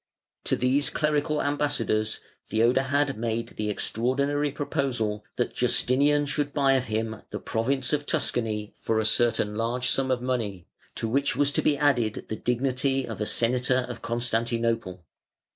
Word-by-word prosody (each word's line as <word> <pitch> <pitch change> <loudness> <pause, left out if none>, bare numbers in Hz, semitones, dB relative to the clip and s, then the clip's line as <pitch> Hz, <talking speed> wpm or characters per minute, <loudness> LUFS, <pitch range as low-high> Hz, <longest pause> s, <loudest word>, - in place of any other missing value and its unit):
To - - +2
these 135 +3 +2
clerical 150 0 0
ambassadors 145 -7 0 0.3
Theodahad 135 +5 +2
made 115 0 -2
the 105 0 -4
extraordinary 140 +7 0
proposal 130 -7 -2
that 120 - -1
Justinian 140 +4 +3
should 145 0 -1
buy 135 -2 +3
of 130 -1 +1
him 110 -1 -3
the - - -5
province 130 +4 -1
of 145 -1 -1
Tuscany 105 -3 0
for 110 - -1
a 110 - +1
certain 110 -1 +2
large 120 +3 0
sum 135 0 +1
of 130 -1 +1
money, 115 -8 -3 0.3
to 115 - -1
which 140 +5 +1
was 145 0 +2
to - - +1
be 145 - +2
added 125 -7 +1
the 110 - -2
dignity 130 +3 0
of - - -6
a 105 - 0
Senator 125 +1 +1
of 120 - -7
Constantinople. 115 -5 -1
125 Hz, 150 wpm, -26 LUFS, 115-140 Hz, 0.3 s, Justinian